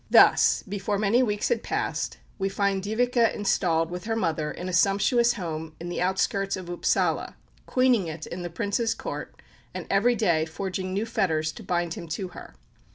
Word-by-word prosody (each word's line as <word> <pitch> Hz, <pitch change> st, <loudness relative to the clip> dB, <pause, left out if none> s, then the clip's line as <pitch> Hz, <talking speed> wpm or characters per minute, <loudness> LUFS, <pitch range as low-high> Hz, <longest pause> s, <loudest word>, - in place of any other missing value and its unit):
Thus, -, -, +6 dB
before 200 Hz, +1 st, -2 dB
many 215 Hz, +4 st, +3 dB
weeks 210 Hz, -4 st, 0 dB
had 480 Hz, -, +1 dB
passed, -, -, -2 dB, 0.2 s
we 195 Hz, 0 st, 0 dB
find 195 Hz, 0 st, 0 dB
Dyveke 235 Hz, +3 st, +2 dB
installed 165 Hz, -5 st, +1 dB
with 180 Hz, +1 st, -6 dB
her 225 Hz, 0 st, -1 dB
mother 165 Hz, -7 st, -1 dB
in 180 Hz, -, -6 dB
a 185 Hz, -, -4 dB
sumptuous 205 Hz, +7 st, +3 dB
home 160 Hz, -5 st, -5 dB
in 170 Hz, +1 st, -6 dB
the 175 Hz, -, -3 dB
outskirts 195 Hz, +1 st, 0 dB
of 185 Hz, -2 st, -8 dB
Upsala, 175 Hz, -, 0 dB, 0.3 s
queening 250 Hz, -7 st, +3 dB
it 155 Hz, 0 st, -6 dB
in 180 Hz, -, -6 dB
the 175 Hz, -, -4 dB
Prince's 205 Hz, +6 st, -1 dB
Court, -, -, -6 dB, 0.4 s
and -, -, -4 dB
every 235 Hz, +5 st, +4 dB
day 170 Hz, -8 st, +2 dB
forging 185 Hz, +2 st, -4 dB
new 200 Hz, +4 st, -1 dB
fetters 160 Hz, -9 st, 0 dB
to -, -, -11 dB
bind 175 Hz, -2 st, -1 dB
him 170 Hz, -4 st, -7 dB
to 180 Hz, +4 st, -4 dB
her. -, -, -11 dB
195 Hz, 180 wpm, -26 LUFS, 175-215 Hz, 0.4 s, Thus